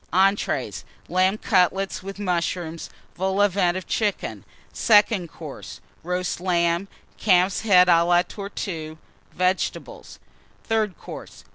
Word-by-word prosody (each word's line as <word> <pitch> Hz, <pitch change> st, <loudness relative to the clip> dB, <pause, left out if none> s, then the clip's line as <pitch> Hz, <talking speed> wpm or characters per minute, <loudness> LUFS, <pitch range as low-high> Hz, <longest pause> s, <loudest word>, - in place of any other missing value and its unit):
ENTREES. 195 Hz, +2 st, +1 dB, 0.3 s
Lamb 185 Hz, +3 st, +2 dB
Cutlets 195 Hz, -1 st, +1 dB
and 195 Hz, +1 st, -8 dB
Mushrooms. 170 Hz, -3 st, -2 dB, 0.3 s
Vol 190 Hz, +2 st, -1 dB
au 205 Hz, -, +6 dB
Vent 185 Hz, -2 st, +1 dB
of 185 Hz, -, -6 dB
Chicken. 210 Hz, -3 st, -2 dB, 0.3 s
SECOND 205 Hz, -5 st, +3 dB
COURSE. -, -, -9 dB, 0.2 s
Roast 180 Hz, +1 st, -2 dB
Lamb. 170 Hz, 0 st, +1 dB, 0.3 s
Calf's 185 Hz, -2 st, +3 dB
Head 185 Hz, -5 st, +5 dB
à 170 Hz, -1 st, +5 dB
la 175 Hz, 0 st, +4 dB
Tortue. 170 Hz, -6 st, -6 dB, 0.4 s
Vegetables. 185 Hz, +1 st, -2 dB, 0.5 s
THIRD 215 Hz, -5 st, -1 dB
COURSE. -, -, -10 dB
185 Hz, 115 wpm, -23 LUFS, 175-200 Hz, 0.5 s, au